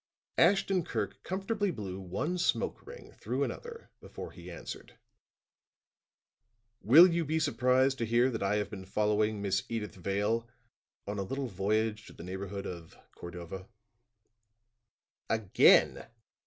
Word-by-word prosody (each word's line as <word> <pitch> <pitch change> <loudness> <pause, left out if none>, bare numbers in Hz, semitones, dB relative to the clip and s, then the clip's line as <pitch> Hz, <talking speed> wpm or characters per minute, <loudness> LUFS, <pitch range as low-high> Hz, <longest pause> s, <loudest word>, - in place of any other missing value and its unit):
Ashton 190 0 +4
Kirk - - -4
comfortably 200 +2 -1
blew 100 - -5
one 95 - -3
smoke - - -1
ring 480 +1 -11
through - - -2
another 470 -1 -7
before - - -9
he - - -11
answered. - - -9 1.8
"Will 145 - +9
you 170 -2 +1
be 160 +1 -1
surprised 130 -3 +2
to 115 - 0
hear 120 +3 +3
that 115 - -4
I 100 +1 +1
have 105 -1 -2
been 95 -3 -8
following 105 +1 +1
Miss 95 -1 +1
Edyth 110 -3 -3
Vale 105 +5 -1 0.6
on 100 0 -4
a - - 0
little 135 +8 -3
voyage 105 +1 -1
to - - -12
the - - -11
neighborhood 95 +2 -5
of 85 -3 -8 0.2
Cordova?" 85 +2 -8 1.6
"Again!" 110 -4 +4
110 Hz, 130 wpm, -31 LUFS, 100-150 Hz, 1.8 s, Will